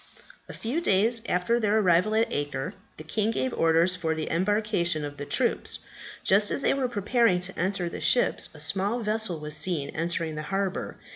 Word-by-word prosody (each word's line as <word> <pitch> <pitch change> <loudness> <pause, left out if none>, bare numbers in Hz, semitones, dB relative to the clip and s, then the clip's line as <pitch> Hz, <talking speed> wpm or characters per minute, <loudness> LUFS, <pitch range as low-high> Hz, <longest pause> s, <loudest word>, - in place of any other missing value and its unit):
A - - -7
few 255 +9 -3
days 225 - +2
after 180 +7 +1
their 215 -1 +2
arrival 185 +1 +3
at 225 +1 +1
Acre, 145 -2 -3 0.2
the 155 - -8
king 210 +7 -1
gave 255 +2 -1
orders 165 +2 +3
for 165 -3 -1
the 155 -1 -4
embarcation 185 -4 0
of 145 0 -7
the 145 - -5
troops. - - +1 0.5
Just 205 +2 +3
as 275 - -2
they - - +3
were 270 -2 0
preparing 230 -3 +2
to 185 +1 -4
enter 180 0 0
the - - -6
ships 245 - +2
a - - -11
small 195 +9 0
vessel 215 -5 -1
was 150 0 -4
seen 165 -6 0
entering 165 -1 -2
the 155 - -4
harbour. 195 -1 -2
190 Hz, 190 wpm, -27 LUFS, 165-220 Hz, 0.5 s, arrival